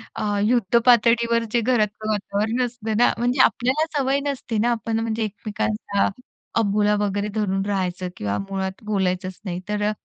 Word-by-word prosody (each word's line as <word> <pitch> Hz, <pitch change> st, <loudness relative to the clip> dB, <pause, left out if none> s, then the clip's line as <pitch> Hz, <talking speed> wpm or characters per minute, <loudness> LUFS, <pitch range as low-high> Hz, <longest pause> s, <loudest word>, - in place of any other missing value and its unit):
अ, -, -, -3 dB, 0.2 s
युद्ध 235 Hz, -1 st, +3 dB
पातळीवर 235 Hz, -1 st, +4 dB
जे 240 Hz, -, +2 dB
घरातलं 215 Hz, -2 st, 0 dB
वातावरण 215 Hz, +4 st, 0 dB
असतं 225 Hz, -3 st, -4 dB
ना, 240 Hz, -, +5 dB
म्हणजे 245 Hz, +2 st, +2 dB
आपल्याला 260 Hz, +6 st, +2 dB
सवय 275 Hz, 0 st, +2 dB
नसते 245 Hz, -5 st, -3 dB
ना, 240 Hz, +3 st, +2 dB
आपण 225 Hz, 0 st, -1 dB
म्हणजे 225 Hz, 0 st, -1 dB
एकमेकांचा 210 Hz, 0 st, -1 dB, 0.5 s
अबोला 210 Hz, 0 st, +2 dB
वगैरे 205 Hz, 0 st, -1 dB
धरून 195 Hz, -2 st, 0 dB
राहायचं 185 Hz, -2 st, -2 dB
किंवा 100 Hz, 0 st, -2 dB
मुळात 190 Hz, +1 st, -4 dB
बोलायचंच 185 Hz, -2 st, -1 dB
नाही. 180 Hz, -1 st, -3 dB
तर 210 Hz, 0 st, -1 dB
अ, -, -, +1 dB
215 Hz, 155 wpm, -23 LUFS, 200-235 Hz, 0.5 s, ना